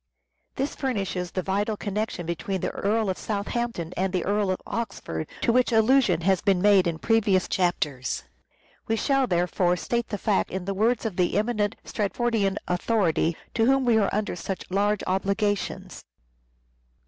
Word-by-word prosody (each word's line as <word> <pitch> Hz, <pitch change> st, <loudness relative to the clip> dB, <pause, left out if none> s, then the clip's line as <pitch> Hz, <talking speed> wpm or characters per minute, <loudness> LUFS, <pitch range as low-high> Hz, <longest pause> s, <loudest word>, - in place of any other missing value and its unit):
This 275 Hz, +2 st, -2 dB
furnishes 195 Hz, -9 st, -2 dB
the 185 Hz, 0 st, -3 dB
vital 205 Hz, +3 st, -1 dB
connection 205 Hz, -3 st, -3 dB
between 170 Hz, +3 st, -3 dB
the -, -, -1 dB
Earl 215 Hz, +2 st, 0 dB
of 185 Hz, -, -2 dB
Southampton 205 Hz, -4 st, -3 dB
and 190 Hz, +1 st, 0 dB
the 185 Hz, -2 st, -1 dB
Earl 205 Hz, 0 st, +1 dB
of 185 Hz, -, 0 dB
Oxford, 80 Hz, -, -4 dB
to 230 Hz, -, +2 dB
which 250 Hz, 0 st, +3 dB
allusion 225 Hz, -5 st, +4 dB
has 190 Hz, +1 st, +2 dB
been 195 Hz, -2 st, +2 dB
made 195 Hz, -1 st, +5 dB
in 165 Hz, -2 st, -1 dB
previous 205 Hz, -2 st, +2 dB
chapters. 150 Hz, -8 st, -1 dB, 0.6 s
We 225 Hz, -, +1 dB
shall 270 Hz, +3 st, +2 dB
therefore 180 Hz, 0 st, +1 dB
state 235 Hz, +5 st, -1 dB
the 205 Hz, -, -3 dB
fact 200 Hz, 0 st, +1 dB
in 185 Hz, -1 st, -4 dB
the 195 Hz, -, -1 dB
words 225 Hz, +4 st, +1 dB
of 210 Hz, -5 st, -3 dB
the 180 Hz, 0 st, +2 dB
eminent 215 Hz, -1 st, 0 dB
Stratfordian 210 Hz, -1 st, 0 dB
authority 175 Hz, -4 st, +1 dB, 0.2 s
to 225 Hz, 0 st, +2 dB
whom 270 Hz, 0 st, +3 dB
we 235 Hz, -2 st, +4 dB
are 200 Hz, -, +2 dB
under 210 Hz, -2 st, -1 dB
such 180 Hz, +2 st, -4 dB
large 205 Hz, +2 st, +1 dB
obligations. 200 Hz, +2 st, -1 dB
200 Hz, 160 wpm, -26 LUFS, 180-225 Hz, 0.6 s, made